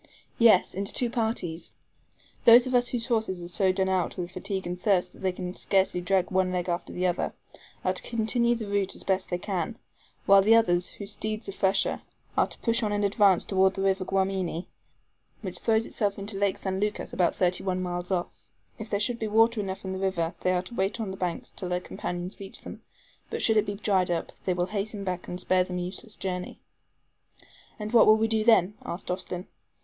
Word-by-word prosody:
"Yes, 225 -6 +5
into 195 +2 -2
two 245 -2 -1
parties. 220 -8 -2 0.7
Those 240 +1 +9
of 255 - -3
us 245 -1 +4
whose 235 -1 -2
horses 220 -7 -1
are - - -6
so 190 +2 +2
done 190 0 0
out 185 -2 0
with 175 -1 -4
fatigue 190 0 -3
and 180 +1 -5
thirst 195 -3 +2
that - - -16
they 190 -1 0
can 180 0 -6
scarcely 190 -2 +1
drag 185 +1 +1
one 185 -1 +2
leg 180 -1 -2
after 175 0 -2
the 180 - -2
other, 180 -1 0 0.5
are - - +2
to - - -1
continue 235 +1 +1
the 225 -2 -5
route 200 -1 -1
as - - -6
they 195 - +2
best 185 0 -4
can, 190 +1 -2 0.5
while 195 0 +7
the 220 +3 +6
others, 180 -6 +3
whose 200 0 -6
steeds 215 +1 -3
are - - -2
fresher, 195 0 +1 0.3
are - - +3
to - - -6
push 230 0 +1
on 215 -2 0
in 205 0 0
advance 200 -2 +4
toward 190 -1 +3
the 195 - -2
river 195 -1 +2
Guamini, 190 -3 -1 0.8
which - - -4
throws 225 0 +2
itself 205 -2 -1
into 200 +1 -4
Lake 200 -1 +1
San 190 -1 -3
Lucas 210 +1 -2
about 175 -2 +2
thirty 180 -1 +1
one 185 -1 -1
miles 175 -1 -3
off. 180 -2 +1 0.5
If 220 0 -7
there 200 - 0
should 235 +3 0
be 220 - -2
water 225 +2 +4
enough 190 -1 -5
in 190 - -3
the 190 - -4
river, 175 -4 -1
they 185 - +2
are 180 0 0
to 190 - -11
wait 195 +1 -1
on 210 -4 -3
the - - -5
banks 175 -3 -3
till 180 - -5
their 180 0 0
companions 180 +1 -5
reach 195 -1 -8
them; - - -9 0.5
but - - -3
should 220 - +4
it 215 -1 +3
be 205 - -2
dried 195 -3 +1
up, 170 -1 -2
they 185 - +1
will 175 0 +1
hasten 205 0 -3
back 180 -2 -4
and 180 - -5
spare 185 0 +2
them 180 0 -5
a - - -2
useless 200 +4 -6
journey." 180 -1 -4 1.2
"And 215 +1 -6
what 235 - +7
will 215 0 +7
we 220 0 +2
do 220 -1 +1
then?" 210 -4 +5
asked 180 +1 -5
Austin. 180 0 -4
195 Hz, 220 wpm, -27 LUFS, 180-215 Hz, 1.2 s, Those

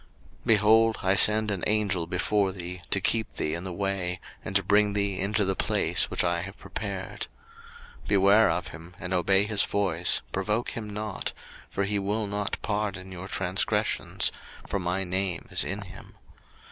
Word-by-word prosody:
02:023:020 - - -15
Behold, 110 +1 +5
I 95 +1 +3
send 105 +1 +4
an 95 -3 -3
Angel 100 -5 +1
before 95 +3 +1
thee, 90 -1 -7
to 100 - +2
keep 110 +3 0
thee 75 - -2
in 85 +3 -4
the 95 - -4
way, 95 -1 -2 0.2
and 95 - -6
to 100 - +4
bring 105 +2 +3
thee 100 -2 0
into 105 +2 +1
the 95 0 0
place - - +1
which - - +1
I 85 -1 +1
have 95 +2 -8
prepared. 100 -3 -5 0.8
02:023:021 - - -12
Beware 100 +2 +5
of 85 0 -1
him, 85 +4 -12
and 90 +2 -3
obey 95 +2 +3
his 105 -1 +1
voice, 90 -4 +1
provoke 105 +5 -1
him 110 -2 -5
not; 105 -1 -4 0.4
for 100 - -1
he 100 +1 0
will 105 +2 -1
not 105 +1 -2
pardon 100 -3 -2
your 95 +1 -7
transgressions: - - 0 0.3
for 100 - -2
my 90 +1 0
name 95 -1 -1
is - - +3
in 100 +2 -3
him. 95 0 -13
100 Hz, 175 wpm, -27 LUFS, 90-105 Hz, 0.8 s, Behold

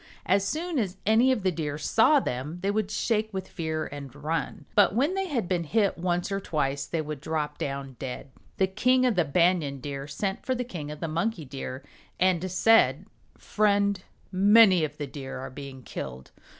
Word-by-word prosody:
As 195 +1 +3
soon 320 - -2
as 190 -4 -2
any 225 +5 +5
of 235 -6 0
the 185 - +2
Deer 150 -3 -3
saw 225 - +4
them 145 - -4
they 200 - +2
would 210 -1 -1
shake 220 0 0
with 190 -1 -4
fear 160 -2 -3
and 140 -2 -8
run. 155 +3 -3
But 205 -1 +4
when 280 +9 +2
they 385 0 -1
had 245 - -1
been 175 -2 0
hit 200 +4 +1
once 175 +2 -1
or 195 - 0
twice 140 -6 -2
they 165 -2 -2
would 150 -2 -6
drop 150 -2 -3
down 135 -2 -4
dead. 130 0 -6 0.3
The 190 - +4
King 255 +7 +2
of 250 - +3
the 175 -4 +2
Banyan 160 -2 +2
Deer 140 +1 -5
sent 195 +5 -3
for 260 - 0
the 250 - -2
King 170 -11 -7
of 150 0 -8
the 165 - -1
Monkey 170 +2 -2
Deer 130 0 -6 0.4
and 185 0 +2
said, 225 +5 +4 0.3
"Friend, 200 -2 +1 0.3
many 200 -2 +6
of 150 -1 -3
the 145 - -3
Deer 135 -1 -7
are 130 - -6
being 135 -1 -9
killed. 65 - -7
175 Hz, 195 wpm, -27 LUFS, 145-210 Hz, 0.4 s, many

